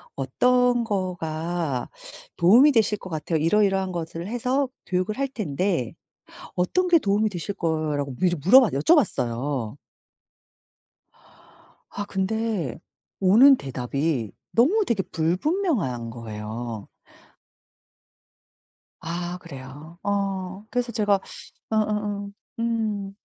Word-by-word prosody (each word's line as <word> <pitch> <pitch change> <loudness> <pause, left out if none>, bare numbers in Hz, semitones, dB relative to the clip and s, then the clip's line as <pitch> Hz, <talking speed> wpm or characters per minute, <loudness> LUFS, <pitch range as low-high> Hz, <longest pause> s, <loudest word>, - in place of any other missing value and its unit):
"어떤 245 - +2
거가 170 - -2 0.5
도움이 235 - +7
되실 220 -3 +2
것 185 - -9
같아요? 160 0 -2
이러이러한 195 +3 +2
것을 170 0 -5
해서 250 +4 0 0.2
교육을 185 +3 -1
할 275 0 0
텐데 180 - -2 0.6
어떤 360 - +1
게 345 -2 +5
도움이 210 -1 +1
되실 195 +1 -5
거예요?"라고 155 -4 -1
미리 175 +4 +1
물어봤 210 - +6
여쭤봤어요. 135 - +1 2.1
아 205 - -5
근데 195 - -2 0.4
오는 230 +9 +7
대답이 135 - -2 0.2
너무 335 - +4
되게 220 -5 +1
불분명한 180 - -1
거예요. 110 -1 -6 2.1
아. 175 +2 -4
그래요? 145 +2 -11
어. 195 -1 -2
그래서 245 -1 -1
제가 205 -3 +2 0.5
어어어. 210 -2 -1 0.3
음. 215 -4 -2
185 Hz, 215 characters per minute, -24 LUFS, 155-220 Hz, 2.1 s, 도움이